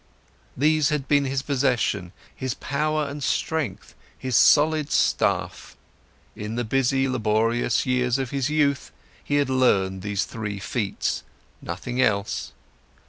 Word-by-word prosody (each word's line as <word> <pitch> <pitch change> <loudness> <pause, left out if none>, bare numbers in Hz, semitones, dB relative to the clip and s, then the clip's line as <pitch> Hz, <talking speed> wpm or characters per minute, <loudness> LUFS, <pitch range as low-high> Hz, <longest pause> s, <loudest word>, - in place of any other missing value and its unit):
These 155 +2 +3
had 150 -3 -2
been 145 0 +3
his 135 0 -1
possessions, 125 -10 0 0.2
his 130 -2 -3
power 150 +1 -1
and 145 +1 -6
strength, 145 -12 -2 0.2
his 130 -2 -3
solid 150 +2 +4
staff; - - 0 0.6
in 105 +2 -5
the 120 - -1
busy, 135 +3 +1
laborious 115 -1 +1
years 125 -1 +1
of 130 -3 -3
his 135 0 -1
youth, 145 -2 +1 0.3
he 145 - -1
had 145 -2 +2
learned 95 -8 +2
these 100 0 -1
three 105 -3 -5
feats, 100 0 -2 0.4
nothing 120 +9 -3
else. 100 -4 0
130 Hz, 130 wpm, -24 LUFS, 110-140 Hz, 0.6 s, solid